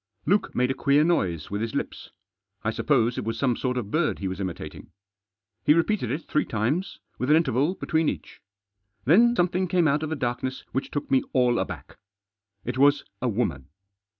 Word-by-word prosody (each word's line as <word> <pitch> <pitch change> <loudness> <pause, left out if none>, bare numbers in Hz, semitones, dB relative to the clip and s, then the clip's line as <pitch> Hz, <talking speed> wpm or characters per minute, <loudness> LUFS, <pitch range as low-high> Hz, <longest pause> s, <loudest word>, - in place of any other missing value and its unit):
Luke 205 +2 +1
made 125 +1 +2
a - - +1
queer 140 +2 +3
noise 95 - 0
with 100 +1 -2
his 115 -1 -3
lips. - - -4 0.5
I - - 0
suppose 120 +2 +1
it - - -3
was 115 - -3
some 130 -4 +1
sort 125 +1 -2
of 110 -4 -4
bird 155 0 +1
he 95 - -3
was 95 +1 -4
imitating. 95 -3 -6 0.7
He 150 - +5
repeated 170 - +1
it 145 +7 -2
three 150 - +1
times; 125 - -1 0.2
with 125 - -1
an 150 - +7
interval 150 +2 +2
between 160 -4 +1
each. - - -7 0.6
Then 230 - +5
something 180 0 +1
came 175 -2 +2
out 145 +1 +2
of 155 - -3
the 160 - -1
darkness 130 -1 -3
which 135 - -2
took 145 - -4
me 130 - +5
all 125 -2 +3
aback. - - -6 0.7
It 125 +2 -3
was 145 +1 +4 0.2
a 125 - +1
woman. 100 - -2
135 Hz, 190 wpm, -26 LUFS, 120-160 Hz, 0.7 s, an